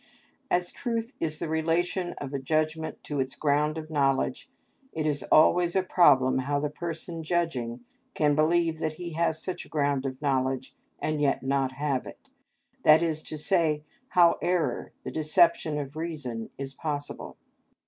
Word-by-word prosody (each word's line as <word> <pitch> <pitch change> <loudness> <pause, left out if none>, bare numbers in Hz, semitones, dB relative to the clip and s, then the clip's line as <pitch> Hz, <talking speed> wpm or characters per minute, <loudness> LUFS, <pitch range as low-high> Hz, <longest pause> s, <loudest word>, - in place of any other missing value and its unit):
As 175 0 +1
truth 230 +1 -3
is 155 -2 -2
the 170 - -3
relation 165 +3 0
of 140 -1 -7
a 140 - -1
judgment 155 +3 -1
to 145 -2 -3
its 130 0 -2
ground 150 +1 +1
of 155 0 -7
knowledge, 135 -3 0 0.4
it 155 -1 -2
is 145 -2 0
always 175 +3 +5
a 190 - +3
problem 130 -9 +4
how 145 +2 0
the 145 0 -2
person 165 +1 -5
judging 155 -8 -1 0.3
can 150 -1 +3
believe 160 +1 +2
that 155 -1 -1
he 175 +1 -7
has 160 -1 0
such 185 +3 -4
a - - -17
ground 140 -3 0
of 130 0 -6
knowledge 130 -2 -1 0.2
and 155 -1 -2
yet 140 -2 +1
not 135 -1 0
have 140 -1 -1
it; 275 - -13 0.5
that 155 +2 +7
is 160 -2 -1
to 155 - -7
say, 155 -3 +1 0.3
how 175 -2 +5
error, 180 -2 0
the - - -5
deception 160 0 +3
of 145 0 -5
reason, 150 -9 -4
is 135 0 -5
possible. 145 -1 -5
155 Hz, 165 wpm, -27 LUFS, 140-170 Hz, 0.5 s, that